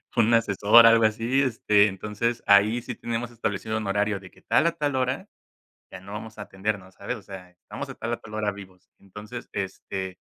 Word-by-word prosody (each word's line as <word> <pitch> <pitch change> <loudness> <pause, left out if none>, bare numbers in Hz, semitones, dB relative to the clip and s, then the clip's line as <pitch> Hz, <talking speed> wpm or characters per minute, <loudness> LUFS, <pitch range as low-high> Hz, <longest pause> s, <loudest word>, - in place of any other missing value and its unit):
un 115 -1 +3
asesor 115 +1 +6
algo 115 0 +6
así, 115 +5 +1
este, 105 -5 +3
entonces, 105 +4 -3
ahí 105 +4 +5
sí 125 0 -6
tenemos 120 +1 -4
establecido 110 -1 -3
un 110 -2 -4
horario 105 0 0
de 95 -1 -13
que - - -22
tal 170 - +2
a - - +3
tal 145 -4 -2
hora, 130 +8 -1 0.6
ya 90 - -9
no 100 +2 -12
vamos 110 +1 -8
a - - -7
atender 100 +2 -3
más, 95 0 -17
¿sabes?, 125 - -4
o - - -12
sea, 95 -2 -10
estamos 90 - -8
de - - -8
tal, 115 +1 -4
a - - -2
tal 110 - -13
hora 105 -1 -1
vivos. 95 -2 -13
Entonces, 105 +5 -10
este, 95 -1 -5
105 Hz, 210 wpm, -25 LUFS, 100-115 Hz, 0.6 s, asesor